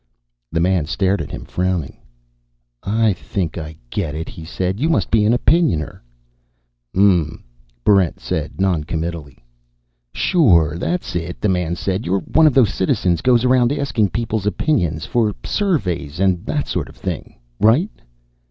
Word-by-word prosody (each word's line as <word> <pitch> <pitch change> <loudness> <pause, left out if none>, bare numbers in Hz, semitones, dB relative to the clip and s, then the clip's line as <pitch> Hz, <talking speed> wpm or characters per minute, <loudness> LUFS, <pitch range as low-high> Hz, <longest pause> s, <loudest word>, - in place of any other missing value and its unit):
The 85 - 0
man 90 -3 +1
stared 95 +1 0
at 70 - -6
him, - - -7
frowning. 90 -5 -2 0.8
"I 110 +1 +2
think 90 -1 -4
I 80 -2 -6 0.2
get 85 -8 -2
it," 80 +1 -5
he 80 - -10
said. 90 +4 -3
"You 155 +5 +1
must 165 - +1
be 110 -2 +4
an 110 - +4
Opinioner." 120 - +1 0.9
"Mmm," 90 -5 +2 0.4
Barrent 95 -3 +3
said, 80 +2 -4
noncommittally. 80 -6 -2 0.7
"Sure, 85 - +3
that's 170 - -2
it," 85 +1 -4
the 105 - +1
man 90 -2 0
said. 95 +3 -2
"You're 95 +2 +1
one 160 -1 +4
of 145 - +2
those 125 -7 +4
citizens 90 -3 +1
goes 125 +1 +3
around 125 -1 +4
asking 130 -8 0
people's 110 -2 -2
opinions. 90 - 0
For 110 -4 0
surveys 90 - -1
and 95 -3 +1
that - - -1
sort - - -3
of - - -15
thing. - - -5 0.2
Right?" 135 - +3
95 Hz, 150 wpm, -19 LUFS, 85-115 Hz, 0.9 s, be